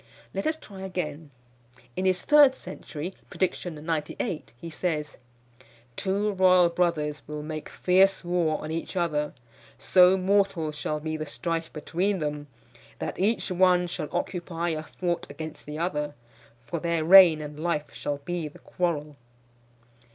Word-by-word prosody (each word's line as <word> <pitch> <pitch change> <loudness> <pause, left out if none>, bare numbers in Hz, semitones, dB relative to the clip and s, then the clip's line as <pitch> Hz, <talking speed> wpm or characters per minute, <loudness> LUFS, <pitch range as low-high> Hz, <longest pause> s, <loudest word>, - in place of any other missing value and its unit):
Let - - -2
us 315 0 0
try 200 -10 -11
again. 165 -5 -4 0.7
In 185 - -1
his 185 -1 +2
third 290 -3 +7
century, 170 - -7 0.2
prediction 180 -2 -2
98, 155 +4 -3
he 165 - -8
says: 155 -2 -2 0.8
"Two 200 +2 0
royal 185 -2 +5
brothers 165 -4 0
will 150 0 -5
make 155 0 -6
fierce 190 +1 +3
war 175 -3 +1
on 155 - -5
each 165 +4 -4
other; 150 -4 0 0.4
So 185 0 +5
mortal 190 -4 +1
shall 150 0 -3
be 155 +1 -3
the 155 0 -5
strife 165 +1 -3
between 180 +6 -1
them, 150 -2 -3 0.5
That - - -5
each 210 +1 +1
one 180 0 +4
shall 170 -3 -4
occupy 170 -1 -2
a 155 -2 -2
fort 175 +2 -3
against 155 +2 -8
the 150 +1 -5
other; 150 -3 -2 0.5
For 165 +8 -4
their 170 -1 0
reign 175 -3 +9
and 150 0 -7
life 155 -2 -2
shall 145 -1 -3
be 175 -3 -2
the 150 - -12
quarrel." 150 -5 -2
170 Hz, 145 wpm, -27 LUFS, 150-185 Hz, 0.8 s, reign